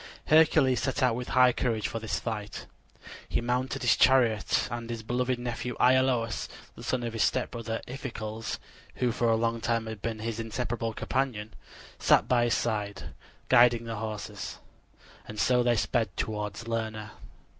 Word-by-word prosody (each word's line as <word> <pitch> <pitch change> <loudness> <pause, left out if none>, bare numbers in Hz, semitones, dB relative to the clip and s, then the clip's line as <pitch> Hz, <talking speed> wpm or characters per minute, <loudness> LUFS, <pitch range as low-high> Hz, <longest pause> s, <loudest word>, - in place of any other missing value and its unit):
Hercules 155 -4 +5
set 135 0 -1
out 125 -2 +4
with 125 +1 -4
high 125 -1 +5
courage 115 -4 -1
for 115 - -4
this 110 -1 -2
fight. 105 -3 -5 0.6
He - - +1
mounted 125 +3 -1
his 120 - +5
chariot, 120 -5 +3
and 120 -1 -5
his 115 -2 -5
beloved 125 +2 0
nephew 120 0 -4
Iolaus, 125 -3 +2 0.3
the - - -11
son 130 -2 -1
of 115 -1 -3
his 115 - -2
stepbrother 115 -1 -1
Iphicles, 115 -4 -5 0.4
who 125 -1 +1
for 120 0 +1
a 115 - +4
long 115 0 0
time 115 -1 0
had 110 -2 -7
been 115 0 -3
his 115 +1 -4
inseparable 115 0 -3
companion, 115 -5 -2 0.5
sat - - +4
by 120 -1 +3
his 120 - +2
side, 105 -3 -2 0.4
guiding 120 -2 +5
the 115 -1 -4
horses; 110 -1 -5 0.7
and 105 - -7
so 125 +2 +3
they 120 -1 +3
sped 110 0 +1
toward 105 +1 -3
Lerna. 110 -2 -3
115 Hz, 160 wpm, -28 LUFS, 110-125 Hz, 0.7 s, Hercules